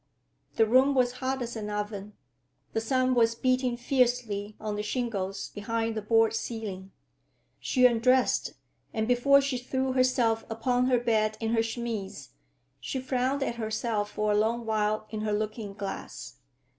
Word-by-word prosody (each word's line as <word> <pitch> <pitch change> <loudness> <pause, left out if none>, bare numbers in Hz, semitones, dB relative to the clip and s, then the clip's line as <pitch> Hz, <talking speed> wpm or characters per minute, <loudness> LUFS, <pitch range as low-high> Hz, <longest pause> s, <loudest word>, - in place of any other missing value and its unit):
The 225 - +4
room 260 +5 +4
was 250 -2 +3
hot 260 0 -1
as 235 0 -6
an 210 -2 -4
oven. 210 0 -4 0.6
The 225 - 0
sun 255 +2 +1
was 230 -2 +3
beating 255 0 +1
fiercely 240 -5 0
on 215 -1 -3
the 210 - -2
shingles 210 -4 -3
behind 225 +2 -2
the 220 - -3
board 225 +1 +3
ceiling. 210 -5 -5 0.7
She 255 -2 +2
undressed, 250 +2 +3 0.4
and 220 0 0
before 275 +3 +5
she 275 -2 -2
threw 260 +1 -1
herself 250 -3 +2
upon 245 +3 +1
her 255 -1 +4
bed 215 -2 +1
in 225 0 -1
her 225 - +3
chemise, 225 - -4 0.5
she 265 - -4
frowned 260 +2 0
at 235 - -3
herself 220 -1 -2
for 210 0 -1
a - - +2
long 225 +3 +1
while 215 -1 0
in 215 -1 -4
her 215 -1 -1
looking 210 -1 -3
glass. 200 -1 -7
225 Hz, 155 wpm, -28 LUFS, 215-250 Hz, 0.7 s, before